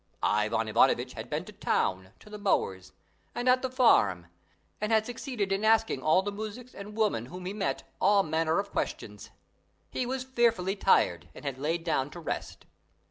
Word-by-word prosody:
Ivan 110 Hz, +2 st, +1 dB
Ivanovitch 110 Hz, -, +3 dB
had -, -, -8 dB
been -, -, -2 dB
to -, -, -10 dB
town, 95 Hz, 0 st, -1 dB
to -, -, -15 dB
the 210 Hz, -, -7 dB
mower's, 95 Hz, -, 0 dB, 0.4 s
and 245 Hz, -, -2 dB
at 255 Hz, 0 st, +5 dB
the 260 Hz, -, -2 dB
farm, 230 Hz, -, +3 dB, 0.6 s
and 215 Hz, +1 st, -1 dB
had 220 Hz, -1 st, +3 dB
succeeded 240 Hz, -4 st, -3 dB
in 195 Hz, +2 st, 0 dB
asking 220 Hz, -9 st, +3 dB
all 155 Hz, +7 st, +3 dB
the 205 Hz, -, -3 dB
muzhiks 220 Hz, +4 st, -7 dB
and 210 Hz, +2 st, -9 dB
women 200 Hz, -, +1 dB
whom 180 Hz, +3 st, -9 dB
he 190 Hz, -, -3 dB
met 205 Hz, -2 st, -2 dB, 0.2 s
all 200 Hz, 0 st, +5 dB
manner 160 Hz, 0 st, 0 dB
of 200 Hz, 0 st, -2 dB
questions. 105 Hz, -1 st, -4 dB, 0.6 s
He 250 Hz, -, -2 dB
was 260 Hz, 0 st, -2 dB
fearfully 230 Hz, -7 st, +1 dB
tired 90 Hz, -, +2 dB
and -, -, -11 dB
had 135 Hz, -2 st, -3 dB
laid 165 Hz, +4 st, -1 dB
down 145 Hz, -5 st, 0 dB
to 175 Hz, -, -9 dB
rest. 165 Hz, -, -5 dB
195 Hz, 185 wpm, -29 LUFS, 135-220 Hz, 0.6 s, at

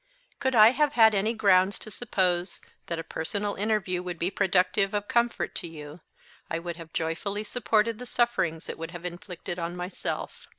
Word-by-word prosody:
"Could 265 Hz, -2 st, 0 dB
I 220 Hz, +1 st, +9 dB
have 295 Hz, +2 st, +2 dB
had 225 Hz, -4 st, +6 dB
any 205 Hz, +2 st, +2 dB
grounds 195 Hz, -2 st, +4 dB
to 215 Hz, -, -10 dB
suppose 185 Hz, -5 st, 0 dB, 0.3 s
that 170 Hz, -, -2 dB
a 165 Hz, -, -4 dB
personal 200 Hz, +7 st, -3 dB
interview 200 Hz, -3 st, 0 dB
would 180 Hz, -1 st, -5 dB
be 175 Hz, +3 st, -1 dB
productive 195 Hz, +2 st, +2 dB
of 205 Hz, 0 st, -2 dB
comfort 240 Hz, -2 st, +1 dB
to -, -, -3 dB
you, 155 Hz, 0 st, -10 dB, 0.5 s
I 165 Hz, -, -1 dB
would 170 Hz, 0 st, -5 dB
have 165 Hz, -2 st, -10 dB
joyfully 180 Hz, +7 st, -2 dB
supported 225 Hz, 0 st, +1 dB
the 250 Hz, -, -7 dB
sufferings 235 Hz, -11 st, 0 dB
it -, -, -6 dB
would 165 Hz, 0 st, -5 dB
have 175 Hz, 0 st, -9 dB
inflicted 175 Hz, 0 st, -6 dB
on 170 Hz, +1 st, -3 dB
myself. 180 Hz, +2 st, -5 dB
190 Hz, 180 wpm, -27 LUFS, 170-215 Hz, 0.5 s, I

